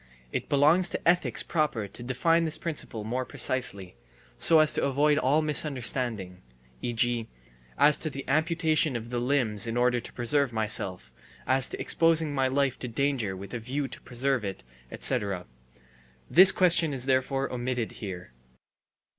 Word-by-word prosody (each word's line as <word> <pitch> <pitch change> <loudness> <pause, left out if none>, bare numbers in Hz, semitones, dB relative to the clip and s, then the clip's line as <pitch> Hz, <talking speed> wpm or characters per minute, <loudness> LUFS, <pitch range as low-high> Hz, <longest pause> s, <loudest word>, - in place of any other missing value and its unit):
(It - - -4
belongs 155 +6 +4
to - - -5
ethics 175 +1 +3
proper 150 - -2
to 100 +5 -12
define 165 +7 +1
this 155 -1 -1
principle 150 -10 -5
more 125 +4 -3
precisely, 125 - -1 0.4
so 165 - +5
as 155 -1 +5
to - - 0
avoid 145 +2 +2
all 145 +4 +1
misunderstanding, 125 - 0 0.4
e. 120 - -3
g., 120 0 0 0.5
as 150 0 +4
to 155 - -2
the 140 -1 -8
amputation 155 0 0
of 115 0 -6
the 120 - -2
limbs 120 -5 0
in 115 +1 -3
order 125 0 +1
to - - -11
preserve 135 +2 +1
myself, 110 -4 -1 0.3
as 130 0 +2
to - - -7
exposing 165 -2 +2
my 135 -1 +1
life 135 0 -1
to 125 - -5
danger 120 -5 -2
with 100 +1 -10
a 120 - -4
view 135 +5 -4
to - - -10
preserve 130 0 -1
it, 95 -10 -6 0.3
etc. 95 -4 -2 0.8
This 185 +3 +8
question 170 -5 +2
is 125 -1 -3
therefore 135 +1 -1
omitted 125 -2 -3
here.) 90 - -9
130 Hz, 160 wpm, -27 LUFS, 115-150 Hz, 0.8 s, This